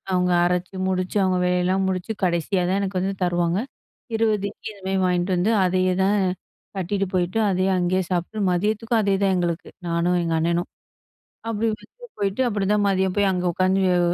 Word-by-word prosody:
அவங்க 180 0 +2
அரைச்சு 180 +2 -1
முடிச்சு, 185 +1 -2
அவங்க 185 -1 +1
வேலையெல்லாம் 180 +2 +1
முடிச்சு 185 +3 -2
கடைசியா 180 +2 0
தான் 195 +2 +1
எனக்கு 190 -1 -2
வந்து 190 +2 -1
தருவாங்க. 175 0 +1 0.6
20 215 -3 +1
இட்லி - - -8
இது 200 - -17
மாரி 190 0 0
வாயின்ட்டு 180 +1 +1
வந்து 180 +5 +1
அதையேதான் 185 +2 +2 0.6
கட்டிகிட்டு 195 +1 -1
போயிட்டு, 180 +3 0
அதையே 185 0 +1
அங்கேயே 180 +1 +1
சாப்பிட்டு, 180 +4 -2
மதியத்துக்கும் 215 +5 +1
அதேதான் 195 -1 +2
எங்களுக்கு, 175 -1 -2 0.2
நானும், 170 +1 +1
எங்க 165 -1 -1
அண்ணனும். 170 +2 0 0.8
அப்டி 225 0 -1
வந்து 485 - -12
போயிட்டு 200 +4 0
அப்டிதான் 205 -1 +1
மதியம் 190 -1 +1
போய் 205 - +3
அங்க 180 -1 -1
உட்காந்து 185 +2 +2 0.2
அ - - +2
185 Hz, 160 wpm, -23 LUFS, 180-200 Hz, 0.8 s, போய்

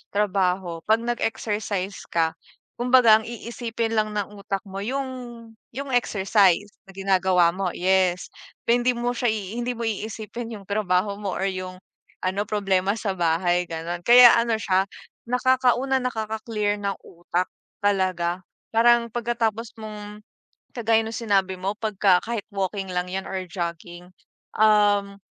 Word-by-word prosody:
trabaho, 185 -4 0
'pag 220 +1 +3
nag-exercise 210 -4 -2
ka, 165 -1 +1 0.5
kumbaga 240 -3 +6
ang - - -11
iisipin 230 -1 -4
lang 215 -1 +1
ng 205 0 -3
utak 200 0 -3
mo 195 0 -7
yung 265 +6 -2 0.7
yung 275 0 -5
exercise 205 -4 +3 0.2
na - - -12
ginagawa 190 -3 +3
mo, 185 -1 -2
yes. 185 -1 +1 0.4
Na - - +4
hindi 245 +1 +2
mo 240 +1 -1
siya, 245 0 -1
hindi 220 +4 -3
mo 235 - -5
iisipin 225 +2 -5
yung - - -14
trabaho 200 -1 +1
mo 200 -3 -3
or - - -2
yung 185 -1 -4 0.5
ano 190 +2 0
problema 195 -1 +1
sa 205 - -2
bahay, 175 +1 +1
gano'n. 165 +1 -4
Kaya 240 +2 +9
ano 230 -1 +1
siya 190 -2 +1 0.4
nakaka 250 0 +3
una 265 0 +1
nakaka-clear 220 -3 -2
ng 200 -1 -1
utak 175 +1 -3 0.4
talaga. 185 -3 0 0.3
Parang 235 +1 +4
pagkatapos 230 -1 -2
mong 210 -1 -8 0.5
kagaya 225 -2 +2
nung 225 - -5
sinabi 195 -5 +1
mo 195 +2 -2
pagka 200 -4 +3
kahit 230 -3 -4
walking 195 0 -2
lang 180 0 -1
yan 190 0 -3
or 190 -1 -3
jogging, 175 0 -6 0.5
um, 205 -2 +3
205 Hz, 140 wpm, -24 LUFS, 185-230 Hz, 0.7 s, Kaya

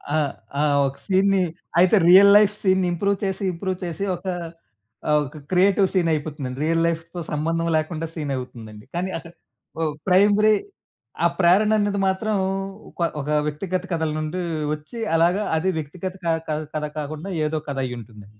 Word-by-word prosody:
ఆ! - - +3 0.4
ఆ! - - +3 0.2
ఒక 135 +1 -6
సీన్‌ని 195 0 +3 0.4
అయితే, 185 +4 +5
రియల్ 200 +2 +9
లైఫ్ 210 0 +4
సీన్‌ని 190 -2 +2
ఇంప్రూవ్ 200 +3 0
చేసి 195 +1 -2
ఇంప్రూవ్ 185 +2 -3
చేసి 175 +4 -4
ఒకా 185 +1 -4 0.8
ఆహ్, 150 - +5
ఒక 145 +3 -10
క్రియేటివ్ 195 +2 +4
సీనయిపోతుందండి. 150 -7 -1
రియల్ 165 +1 +2
లైఫ్‌తో 170 +1 -4
సంబంధం 165 +3 -1
లేకుండా 155 +1 -2
సీనవుతుందండి. 125 -8 -6
కానీ 180 +2 -1
అక్క 165 - -10 0.5
ఒ - - +1 0.2
ప్రైమరీ 205 +3 +5 0.7
ఆ - - +8
ప్రేరననేది 205 +3 +3
మాత్రం 205 +3 0 0.6
కొ - - +2 0.2
ఒక 140 - -7 0.2
వ్యక్తిగత 180 +4 -3
కథల 160 -2 0
నుండి 155 +4 -3 0.3
వచ్చి, 155 +9 -8 0.2
అలాగా 175 +5 +3
అది 180 +4 0
వ్యక్తిగత 170 +5 -5
క - - +1 0.5
కథ 150 0 -1
కాకుండా 155 +5 -5 0.2
ఏదో 155 +1 -1
కథైయుంటుందండి. 115 -6 -6
170 Hz, 140 wpm, -23 LUFS, 150-190 Hz, 0.8 s, రియల్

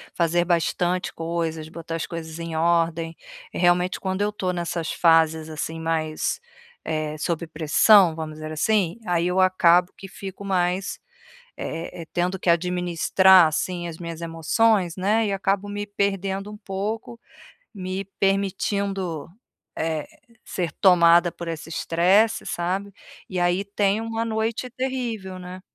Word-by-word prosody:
fazer 175 0 +2
bastante 175 +1 0
coisas, 165 -1 -3
botar 165 0 -6
as 165 - -2
coisas 160 -1 -7
em 165 -1 -5
ordem, 165 0 +1 0.4
e - - -5
realmente 180 +1 +2
quando 190 0 -2
eu 210 +1 +1
tô 185 -3 -2
nessas 170 -2 -3
fases, 160 -1 +3
assim, 160 +1 -4
mais, 160 - -1 0.5
eh, 155 -1 -2
sob 170 +2 -2
pressão, 165 +3 +5
vamos 160 -1 -6
dizer 155 0 -7
assim, 180 +3 +1
aí 175 -1 +1
eu 180 +1 +1
acabo 180 -1 +4
que 195 - -9
fico 195 +1 -9
mais, 185 0 0 0.6
eh 165 +1 -5
eh, - - -13
tendo 180 +2 0
que 175 - -1
administrar, 180 +1 +4
assim, 175 +3 -2
as 160 - -7
minhas 170 -1 -7
emoções, 170 +3 +1
né, 210 +4 +1
e 200 - -1
acabo 195 +1 0
me 205 0 -4
perdendo 195 0 -2
um 210 - -9
pouco, 210 +4 -5 0.5
me 190 0 -4
permitindo, 195 -3 -1 0.5
eh, 160 -2 -2 0.4
ser 175 -4 -3
tomada 175 -2 +5
por 170 - -8
esse 165 0 -5
estresse, 185 +7 +2
sabe. 190 +4 -2 0.4
E 185 - -2
aí 175 +2 +2
tenho 200 +1 0
uma 225 0 -2
noite 225 +2 -2
terrível, 240 -7 -4
né? 180 +1 -9
180 Hz, 140 wpm, -24 LUFS, 165-195 Hz, 0.6 s, pressão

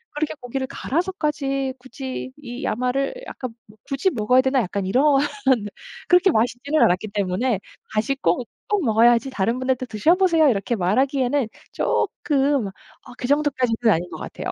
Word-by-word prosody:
그렇게 300 0 -1
'고기를 260 +2 -3
갈아서까지 280 -5 -2
굳이 260 0 -6
이 250 -3 -8
야마를 255 - 0
약간 255 -3 -6
뭐 210 +1 -19
굳이 280 +7 +1
먹어야 250 +2 +3
되나.' 265 -1 +2
약간 195 +1 -3
이런 250 +8 +2 1.0
그렇게 360 +1 +5
맛있지는 245 +6 +1
않았기 185 +5 +2
때문에 200 +3 0 0.3
다시 220 +6 +1
꼭 230 -1 0 0.2
꼭 410 -5 +1
먹어야지 235 +3 +4
다른 235 0 -1
분한테 255 0 0
"드셔보세요." 325 - +3
이렇게 215 +1 0
말하기에는 255 +6 +1 0.2
쪼끔 275 -5 0
어 205 +5 -15
그 - - -5
정도까지는 255 -6 +2
아닌 175 +2 -2
것 - - -7
같아요. - - -6
255 Hz, 350 characters per minute, -22 LUFS, 225-280 Hz, 1.0 s, 그렇게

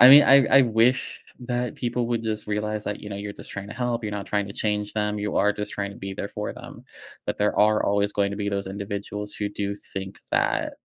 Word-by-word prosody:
I 125 - +11
mean, 145 +2 +11
I 135 0 +7
I 135 +4 +7
wish 120 +2 +2 0.2
that 125 0 -2
people 120 0 -1
would 120 -1 0
just 110 -1 -3
realize 105 0 -2
that, 105 - -3
you 105 - -8
know, 100 - -5
you're 100 +1 -5
just - - -11
trying 100 0 -6
to - - -7
help, 120 -2 -1
you're 105 - -2
not 100 -1 -4
trying 100 -1 0
to - - -6
change 105 0 -1
them, 105 -1 -1
you 105 0 -2
are 105 +1 +4
just 105 0 -5
trying 100 0 -3
to - - -13
be 95 0 -6
there 100 +1 -4
for 105 0 -4
them, - - -11 0.4
but - - -2
there 105 0 +1
are 105 0 +5
always 100 0 +1
going 100 -1 +1
to - - -4
be 100 0 -2
those 100 -1 -2
individuals 100 +1 -5
who 105 - -2
do 100 0 -3 0.2
think 95 0 -5
that - - +1
105 Hz, 255 wpm, -25 LUFS, 100-110 Hz, 0.4 s, I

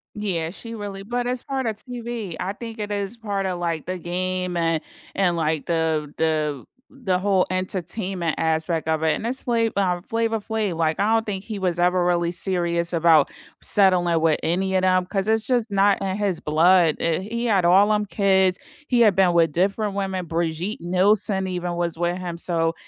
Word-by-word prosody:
Yeah, 180 -6 -2
she 230 +5 -9
really 200 -2 -6
but 245 +3 -2
it's 250 0 -2
part 265 -2 -3
of 220 - -1
TV. 235 -7 -5
I 190 +2 -2
think 225 0 -8
it 210 0 -4
is 200 +2 -3
part 200 -3 -3
of, 180 -2 -2
like, 165 -3 -2
the 185 0 -3
game 180 +1 -2
and 165 -1 +1 0.3
and 180 -3 +2
like 160 -2 -1
the 160 -3 -1
the 155 -3 0 0.3
the 195 -9 -1
whole 190 -1 +2
entertainment 185 -1 -2
aspect 160 0 0
of 160 0 0
it, 160 - +3
and 230 - -4
it's 260 +2 -3
Fla 230 -2 +1
uh, 180 -3 +1
Flavor 225 -1 0
Flav, 210 -5 -2
like, 160 +1 0
I 215 +2 +2
don't 225 0 +2
think 195 -2 -4
he 215 -3 -6
was 180 -2 -1
ever 180 0 +2
really 175 -1 +1
serious 170 -1 -1
about 165 -3 +4 0.3
settling 180 -5 +3
with 160 -2 +2
any 190 +3 0
of 185 - +2
them 185 -1 +3
'cause 195 +1 -2
it's 220 0 +1
just 245 -3 0
not 200 0 +3
in 190 -1 -1
his 200 -4 -1
blood. 165 +1 +4
Uh, 165 -1 +1
he 230 +5 -4
had 195 -5 +2
all 195 +4 +5
'em 210 0 +1
kids, 190 -2 +2 0.3
he 245 -2 +2
had 210 -5 +4
been 185 -2 +4
with 165 -2 +3
different 195 +5 0
women; 190 -3 -3
Brigitte 170 +4 -2
Nielsen 190 +2 +2
even 175 -1 -3
was 170 -1 -2
with 175 +1 -1
him, 175 -2 -5
so 165 -1 0
185 Hz, 195 wpm, -23 LUFS, 170-205 Hz, 0.3 s, all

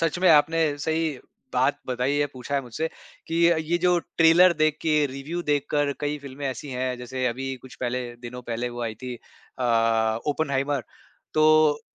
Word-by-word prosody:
सच 165 +1 0
में 185 0 +4
आपने 155 0 +4
सही 160 +2 0 0.4
बात - - +2
बताई 130 +3 0
है 145 0 +2
पूछा 130 +2 -6
है 140 - +2
मुझसे 125 +7 -3 0.4
कि 165 - -3 0.4
ये 175 - +3
जो 180 0 +3
ट्रेलर 170 +2 +5
देख 155 -1 +1
के, 150 -2 +3
रिव्यू 140 +6 -5
देखकर 145 -1 0
कई 150 0 -2
फ़िल्में 140 0 -7
ऐसी 135 +2 -6
हैं, 130 0 -2
जैसे 125 +1 -3
अभी 135 +2 -2
कुछ 130 - -12
पहले 125 0 -1
दिनों 125 +1 -8
पहले 120 +1 -3
वो 120 0 -6
आई 115 -2 -3
थी 125 +2 -7
अ, 115 -2 0
ओपेनहाइमर, 140 -2 0 0.5
तो 155 -1 +5
140 Hz, 170 wpm, -25 LUFS, 125-155 Hz, 0.5 s, ट्रेलर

